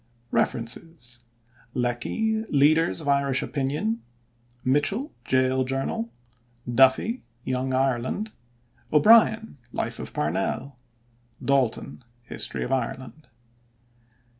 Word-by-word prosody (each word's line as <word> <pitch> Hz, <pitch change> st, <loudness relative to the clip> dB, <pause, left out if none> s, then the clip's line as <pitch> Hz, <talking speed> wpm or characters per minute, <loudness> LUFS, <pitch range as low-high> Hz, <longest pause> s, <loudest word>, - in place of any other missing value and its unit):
REFERENCES: 120 Hz, 0 st, -1 dB, 0.5 s
Lecky: 220 Hz, -, 0 dB
Leaders 155 Hz, 0 st, +3 dB
of 145 Hz, -, -7 dB
Irish 140 Hz, -1 st, +2 dB
Opinion; 150 Hz, -, -1 dB, 0.6 s
Mitchel: 150 Hz, -, +1 dB
Jail 130 Hz, 0 st, +2 dB
Journal; 135 Hz, -, -2 dB, 0.6 s
Duffy: 130 Hz, -, +3 dB, 0.2 s
Young 130 Hz, 0 st, -1 dB
Ireland; 130 Hz, -, 0 dB, 0.6 s
O'Brien: 220 Hz, +2 st, +5 dB
Life -, -, -2 dB
of -, -, -6 dB
Parnell; 95 Hz, -, -2 dB, 0.6 s
D'Alton: 130 Hz, -2 st, 0 dB, 0.2 s
History 120 Hz, -, -2 dB
of 125 Hz, -, -4 dB
Ireland. 130 Hz, +3 st, -3 dB
135 Hz, 85 wpm, -25 LUFS, 130-165 Hz, 0.6 s, O'Brien